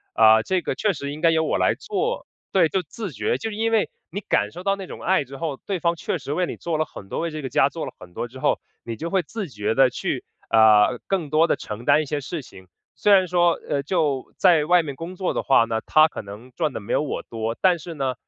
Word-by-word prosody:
呃， 110 0 +7
这 185 -1 0
个 - - -2
确 210 -3 +1
实 140 -1 -5
应 150 - -7
该 165 - +5
由 160 0 +2
我 - - 0
来 - - +3
做” 445 +3 -2 0.3
对， 180 -4 +4
就 190 - 0
自 195 +4 -7
觉。 - - -1
就 225 - -4
是 210 - -6
因 225 +1 0
为 225 -2 +2 0.2
你 200 - -3
感 105 - 0
受 180 - -9
到 195 0 +2
那 195 -1 -7
种 - - -9
爱 185 -4 +2
之 135 +1 -10
后， 150 -3 -3
对 195 -3 -2
方 170 0 +1
确 - - -3
实 140 - -4
为 180 +3 +1
你 - - -5
做 165 -2 -3
了 155 - +1
很 95 -9 -12
多， - - -3
为 165 -1 -2
这 155 - -5
个 130 - -4
家 135 - +4
做 160 +2 -5
了 - - -6
很 90 -1 -13
多 120 - -4
之 125 +3 -13
后， - - +1 0.2
你 115 - -5
就 165 +8 -5
会 185 -1 +1
自 200 0 -6
觉 105 -1 -2
地 135 0 +5
去， - - -3 0.3
呃， 110 +2 +5
更 170 -7 -1
多 160 +2 +4
地 - - +2
承 105 +2 -7
担 155 +5 +4
一 - - -7
些 145 +1 -3
事 150 +2 -5
情。 95 -4 -15 0.3
虽 210 - +2
然 190 -2 +6
说， 175 -1 +3
呃， 140 - 0
就 145 -4 -1
在 160 -4 +4
外 175 +1 +4
面 140 -3 -6
工 170 +5 -7
作 185 0 -1
的 - - -1
话 135 -4 +4
呢， 110 -1 -2
她 155 0 +6
可 - - -7
能 105 +5 -11
赚 150 - -1
得 - - -4
没 100 - -4
有 - - +2
我 150 - -3
多， 115 0 -4
但 180 -3 +3
是 170 +1 -8
呢， 135 -3 -1
155 Hz, 295 characters per minute, -23 LUFS, 130-180 Hz, 0.3 s, 呃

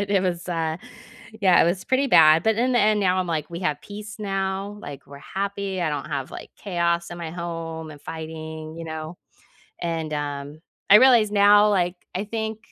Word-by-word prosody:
but 200 0 -3
it 195 -2 +3
was, 180 -1 -2
uh, 165 -1 -2 0.6
yeah, 185 -3 +5
it - - +3
was 185 +2 -1
pretty 265 +2 +1
bad, 160 -7 +6
but 220 -1 +2
in 250 +2 +1
the 245 - +3
end, 215 -1 +3
now 185 -1 +2
I'm 185 - 0
like, 160 -2 -3
"We 170 - -5
have 150 -5 -1
peace 210 +1 -9
now," 195 0 -3
like, 140 -1 -9
"We're 140 0 -11
happy, 195 +1 -3
I 160 - 0
don't 145 0 -3
have, 140 -3 -4
like, - - -9
chaos 170 -3 -1
in 175 - -7
my 165 -2 -5
home 165 -2 -6
and 145 -1 -12
fighting," 160 0 -7
you 165 - -6
know? 160 +1 -7 0.6
And, 165 -2 -3
um, 145 +1 -5 0.3
I 205 - +9
realized 235 -4 +6
now, 205 +1 +6
like, 180 -2 +1 0.2
I 190 +3 -2
think, 220 0 -4
175 Hz, 205 wpm, -24 LUFS, 160-200 Hz, 0.6 s, I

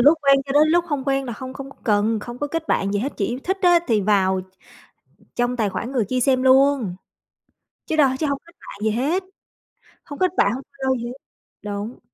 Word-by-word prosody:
lúc 295 +6 +6
quen 275 -1 +6
cho 270 - -3
đến 300 +2 +5
lúc 345 +2 +3
không 285 -4 -2
quen 270 0 +1
là 240 - -5
không 260 +4 -7
không 275 0 -8
có - - -16
cần 215 0 +2
không 240 +3 -8
có 290 - -2
kết 325 +2 -4
bạn 195 +1 +1
gì 205 - +1
hết, 265 +7 -2
chỉ 235 +4 -2
thích 380 +2 0
á 350 -1 +6
thì 225 -4 +2
vào 190 -2 +2
tr - - -11 0.9
trong 245 +1 0
tài 220 -4 0
khoản 225 +6 -4
người 245 -6 0
kia 255 - 0
xem 255 +1 +2
luôn 260 -7 +4 0.9
chứ 315 - -1
đâu 285 -4 +5
chứ 315 - 0
hông 280 -1 -1
kết 340 - -19
bạn - - -11
gì 220 - +2
hết. 295 - 0 0.8
Hông 285 - -9
kết 370 -1 +2
bạn, 200 - +4
hông 265 - -6
follow 265 -1 0
gì - - -4
hết. 240 - -6 0.5
Đúng. 205 +3 -5
260 Hz, 230 wpm, -22 LUFS, 220-285 Hz, 0.9 s, lúc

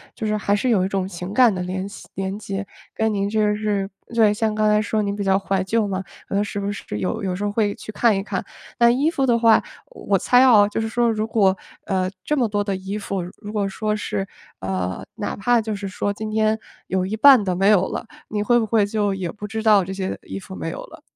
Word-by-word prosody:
就 220 - -4
是 215 0 0
还 205 0 +1
是 250 +5 0
有 195 -6 +3
一 - - 0
种 195 -1 -1
情 180 +1 -6
感 245 -2 +5
的 185 - -3
联 185 +2 -3
系 200 - -12
联 195 +1 -3
结， 200 -2 -5 0.3
跟 220 0 0
您 200 -1 0
就 210 -1 +2
是 205 -2 -1 0.2
对， 220 -3 +5
像 215 +1 0
刚 215 0 +2
才 210 0 +4
说 215 0 0
您 200 -1 -2
比 205 - -3
较 195 -1 +3
怀 195 -1 -1
旧 215 +2 0
嘛， 190 -1 -3 0.4
是 205 - -4
不 200 0 -2
是 205 - -6
有 220 +4 -2
有 185 -2 -1
时 200 - -4
候 205 - 0
会 205 -1 +1
去 - - -9
看 225 0 +3
一 195 - -1
看。 215 - -4 0.3
那 235 -1 +6
衣 270 +6 +2
服 275 -5 0
的 240 -2 +3
话， 225 -1 +5 0.3
我 205 - -1
猜 250 +7 +4
啊， 215 -6 +6
就 210 - -2
是 225 - -1
说 235 +1 +1
如 215 -1 -1
果， 195 -4 +3 0.3
呃， 185 -1 0
这 300 +7 0
么 245 - +2
多 205 -1 -1
的 200 -1 -2
衣 190 +2 -5
服， 200 -2 -3 0.2
如 205 -1 -8
果 205 -2 0
说 210 +2 -2
是， 195 -2 -3 0.3
呃， 95 -1 -3
哪 210 -2 -3
怕 240 +4 +2
就 220 -1 -3
是 200 0 -5
说 205 +1 -2
今 215 +1 -5
天 215 0 +2 0.3
有 185 -1 0
一 215 +3 -3
半 260 -2 +7
的 185 -2 -1
没 195 +2 +2
有 190 -3 +4
了， - - -5 0.2
你 210 -1 -1
会 240 +3 +4
不 225 - 0
会 215 -1 +2
就 205 -1 0
也 185 -3 -3
不 210 0 -8
知 220 +1 -4
道 210 -3 +5
这 185 - -6
些 190 -1 -3
衣 95 - -7
服 95 - -10
没 80 -2 -4
有 - - -6
了？ - - -14
205 Hz, 270 characters per minute, -22 LUFS, 195-220 Hz, 0.4 s, 半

